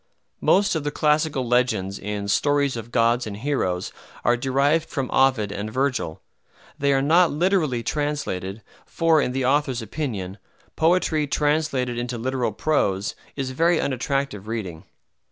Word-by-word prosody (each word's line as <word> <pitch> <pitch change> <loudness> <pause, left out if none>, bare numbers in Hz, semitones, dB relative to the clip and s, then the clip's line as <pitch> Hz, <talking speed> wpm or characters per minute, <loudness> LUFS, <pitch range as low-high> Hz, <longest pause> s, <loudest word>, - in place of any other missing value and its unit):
Most 200 +1 +3
of 160 -3 -1
the 145 - -1
classical 150 -3 +1
legends 110 -6 +1
in 105 0 -4
"Stories 140 +5 +2
of 115 0 -7
Gods 120 0 +2
and 100 -1 -6
Heroes" 105 -8 -1 0.3
are 120 - +4
derived 140 +6 +1
from 135 -3 -3
Ovid 125 -6 +3
and 105 +2 -4
Virgil. 130 - -1 0.6
They 140 0 +2
are 135 0 +2
not 170 +4 +5
literally 155 -7 +1
translated, 115 -10 -3 0.2
for, 165 -2 +3
in 125 - -1
the 130 0 -1
author's 130 -3 +1
opinion, 105 -6 -4 0.4
poetry 160 -2 +2
translated 140 -5 0
into 120 0 -3
literal 125 -1 -1
prose 105 -6 0 0.2
is 135 -2 -3
very 165 +6 +2
unattractive 130 -5 -2
reading. 95 -7 -5
130 Hz, 140 wpm, -23 LUFS, 110-145 Hz, 0.6 s, not